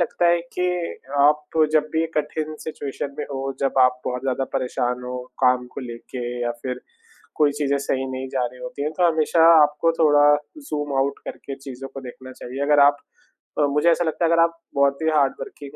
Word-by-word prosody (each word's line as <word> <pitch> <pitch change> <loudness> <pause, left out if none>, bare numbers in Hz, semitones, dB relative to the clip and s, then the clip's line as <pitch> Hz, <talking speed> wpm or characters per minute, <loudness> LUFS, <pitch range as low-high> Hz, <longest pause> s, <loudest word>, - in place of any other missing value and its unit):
लगता 175 0 +1
है 170 0 +4 0.2
कि 180 - 0 0.6
आप 150 +2 +2 0.2
जब 155 -1 +3
भी 160 0 +1
कठिन 155 +1 -2
सिचुएशन 140 -2 -5
में 150 - -2
हो, 135 0 -3
जब 135 -1 0
आप 125 0 +4
बहुत 125 0 -2
ज़्यादा 135 0 -1
परेशान 125 -1 -1
हो 125 0 -4 0.3
काम 125 -1 +3
को - - -6
लेके 125 0 -8 0.2
या 120 - 0
फिर 125 -1 -4 0.6
कोई 150 -2 +3
चीज़ें 140 -1 0
सही 135 -1 -2
नहीं 130 0 -5
जा 130 -2 0
रही 125 +1 -11
होती 165 -4 -6
हैं, 150 - -1
तो 175 +2 +2
हमेशा 160 0 +2 0.2
आपको 150 +3 +2
थोड़ा 145 -2 +5 0.3
ज़ूम 145 -1 -3
आउट 140 +1 0
करके 140 - -7
चीज़ों 135 -1 -9
को 135 - -6
देखना 130 0 -10
चाहिए। 130 +2 -8
अगर 145 0 +4
आप 145 0 +6 0.6
अ, - - +3
मुझे 150 +4 +3
ऐसा 170 +1 +3
लगता 165 +1 -1
है 165 - +2
अगर 165 0 +4
आप 165 0 +2 0.2
बहुत 140 0 +3
ही 160 - +2
हार्डवर्किंग 140 0 -2
140 Hz, 200 wpm, -22 LUFS, 130-155 Hz, 0.6 s, आप